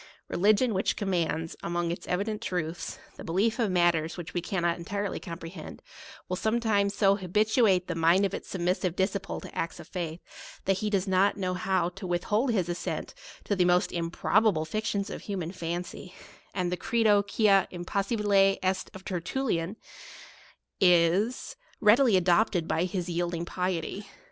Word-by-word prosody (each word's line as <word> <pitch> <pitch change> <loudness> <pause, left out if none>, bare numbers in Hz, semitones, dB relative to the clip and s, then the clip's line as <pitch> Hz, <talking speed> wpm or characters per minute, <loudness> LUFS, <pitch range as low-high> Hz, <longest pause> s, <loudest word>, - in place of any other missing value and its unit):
Religion, 215 +5 +3
which 190 +1 0
commands, 165 -4 -1
among 170 0 -1
its 170 - -6
evi 185 +3 0
dent 215 -1 -4
truths, 170 -2 -3 0.2
the - - -8
belief 205 +9 0
of 225 -4 +2
matters 175 -3 +2
which 175 0 -7
we 175 - -1
cannot 175 -1 -1
entirely 200 +3 -3
comprehend, 165 -1 -8 0.5
will 180 - -2
sometimes 215 -1 +1
so 200 -1 +4
habituate 210 0 +2
the - - -3
mind 165 +4 +4
of 195 - -2
its - - -6
submissive 180 -1 -1
disci 190 +1 0
ple 195 - -5
to - - -11
acts 165 - -3
of - - -10
faith, 170 -3 -4 0.5
that 195 -1 +1
he 215 - -1
does 200 -1 0
not 190 +2 +3
know 185 -2 -1
how 180 -1 0
to 185 +1 -8
withhold 210 +8 +1
his 190 -7 0
assent 175 0 -4 0.3
to 205 - -1
the 185 - +3
most 180 0 +2
im 170 -1 -2
probable 195 -2 +2
fictions 200 +2 -2
of - - -6
human 185 -5 -4
fancy; 175 +1 -5 0.4
and 180 -2 -2
the 180 - -1
Credo 220 -2 +3
quia 200 -1 +3
impossibile 195 +2 +1
est 185 0 0
of 190 0 -11
Tertullian 185 0 -2 1.0
is 180 +6 +3 0.2
read 215 +4 +6
ily 240 -8 +5
adopted 180 -1 +2
by 170 - +1
his 180 -1 -3
yielding 170 -1 -2
piety. 180 +2 -3
185 Hz, 165 wpm, -28 LUFS, 175-205 Hz, 1.0 s, read